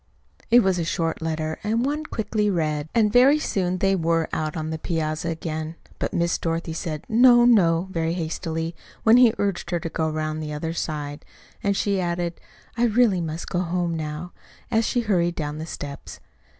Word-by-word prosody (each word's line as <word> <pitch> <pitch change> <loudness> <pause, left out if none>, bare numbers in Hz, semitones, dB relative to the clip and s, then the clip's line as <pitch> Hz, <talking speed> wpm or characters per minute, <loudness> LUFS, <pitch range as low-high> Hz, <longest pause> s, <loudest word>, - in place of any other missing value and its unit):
It 240 0 +6
was 190 -2 +2
a - - 0
short 165 -1 -1
letter, 160 -1 -2
and 225 +4 +1
one 300 +2 -2
quickly 210 -4 -1
read; 155 -4 -1
and 215 -2 +3
very 265 +4 +6
soon 185 -10 -1
they 195 +1 +2
were 165 -2 +1
out 155 0 -2
on 155 0 -3
the 160 - -4
piazza 160 0 -2
again. 160 -1 -4 0.2
But - - -1
Miss 170 0 0
Dorothy 165 0 -2
said 160 -2 -4
"No, 240 +1 +6
no!" 180 -7 +4
very 165 -2 -1
hastily 165 -1 -3 0.3
when 225 +2 +7
he 245 -3 +6
urged 195 -3 -1
her 175 -1 0
to 165 - -4
go 160 0 -1
around 155 0 -2
on - - -4
the 150 -1 -4
other 160 +2 -3
side; 145 -3 -4 0.4
and 200 -1 +1
she 200 -2 +1
added, 175 -1 -2 0.3
"I 240 0 +2
really 220 -5 +3
must 160 0 -4
go 175 - -1
home 175 -1 -1
now," 155 +2 -5 0.4
as 225 -1 +2
she 245 - +1
hurried 175 -6 +1
down 150 -1 -4
the 160 - -5
steps. 140 -3 -7
170 Hz, 190 wpm, -24 LUFS, 160-200 Hz, 0.4 s, when